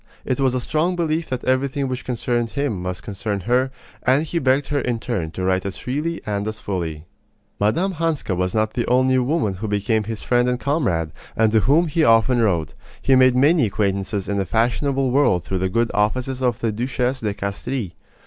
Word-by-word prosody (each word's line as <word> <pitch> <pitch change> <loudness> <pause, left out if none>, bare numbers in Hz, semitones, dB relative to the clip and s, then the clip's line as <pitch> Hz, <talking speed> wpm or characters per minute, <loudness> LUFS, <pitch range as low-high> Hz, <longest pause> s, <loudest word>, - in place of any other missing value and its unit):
It 130 - -1
was 130 -2 +2
a - - +1
strong 155 +8 0
belief 165 -1 -1
that 130 -1 -3
everything 135 +2 0
which 130 0 -4
concerned 120 -1 -1
him 135 -8 -2
must 90 0 -4
concern 100 -1 -3
her; 125 +6 +1 0.3
and 130 +4 +3
he 170 +2 -2
begged 135 0 +1
her 145 -1 +1
in 120 -2 -1
turn 110 -9 -3
to 95 +3 -5
write 95 0 +1
as 100 0 -5
freely 150 +6 -3
and 105 -1 -2
as 110 0 -4
fully. 85 -7 -4 0.5
Mme. 165 - +1
Hanska 160 - -1
was 90 +2 -1
not 110 0 +1
the 120 - -1
only 130 +1 +3
woman 125 - 0
who 110 - -2
became 105 +1 0
his 110 0 -5
friend 120 0 +2
and 125 0 -1
comrade, 120 - 0 0.2
and 110 -1 +3
to 110 - +4
whom 150 +10 +3
he 160 0 +1
often 115 0 +4
wrote. 85 -8 +1 0.3
He 135 - +2
made 130 -1 +5
many 145 0 +4
acquaintances 100 0 -1
in 100 0 -1
the 95 - 0
fashionable 130 +3 +1
world 125 -10 +3
through 95 - -2
the 95 +1 0
good 115 +4 +1
offices 125 +5 0
of 125 -1 0
the 115 - +1
Duchesse 125 +3 -1
de 105 -2 -2
Castries. 100 +1 -3
120 Hz, 205 wpm, -21 LUFS, 105-135 Hz, 0.5 s, made